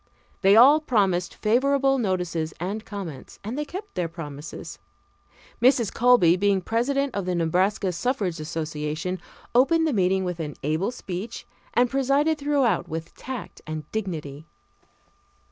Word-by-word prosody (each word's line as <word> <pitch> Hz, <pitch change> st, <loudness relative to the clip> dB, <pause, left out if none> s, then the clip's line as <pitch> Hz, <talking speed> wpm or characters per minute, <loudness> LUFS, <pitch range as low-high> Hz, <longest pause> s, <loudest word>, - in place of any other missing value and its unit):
They 195 Hz, +1 st, +6 dB
all 270 Hz, +7 st, +8 dB
promised 195 Hz, -, +1 dB
favorable 270 Hz, +4 st, +2 dB
notices 180 Hz, -6 st, -1 dB
and 200 Hz, +6 st, -3 dB
comments, 190 Hz, -11 st, -8 dB
and 220 Hz, +5 st, -4 dB
they 300 Hz, +1 st, -2 dB
kept 390 Hz, +6 st, -8 dB
their 175 Hz, -2 st, -1 dB
promises. 150 Hz, -2 st, -8 dB, 0.8 s
Mrs. 240 Hz, -4 st, +4 dB
Colby, 240 Hz, -9 st, +5 dB
being 195 Hz, +1 st, +2 dB
president 260 Hz, +7 st, 0 dB
of 200 Hz, -2 st, -3 dB
the 180 Hz, -, 0 dB
Nebraska 185 Hz, +4 st, +1 dB
Suffrage 190 Hz, -, -1 dB
Association, 155 Hz, +3 st, -3 dB, 0.3 s
opened 320 Hz, +7 st, +4 dB
the 310 Hz, -, +1 dB
meeting 190 Hz, -2 st, +2 dB
with 180 Hz, -2 st, -3 dB
an 150 Hz, -3 st, -4 dB
able 155 Hz, +8 st, 0 dB
speech, 215 Hz, -2 st, -6 dB, 0.3 s
and 245 Hz, +1 st, +4 dB
presided 275 Hz, +4 st, +1 dB
throughout 280 Hz, -, +1 dB
with 160 Hz, +1 st, -5 dB
tact 260 Hz, -2 st, -7 dB
and 155 Hz, -1 st, -4 dB
dignity. 160 Hz, -8 st, -5 dB
195 Hz, 135 wpm, -25 LUFS, 170-250 Hz, 0.8 s, all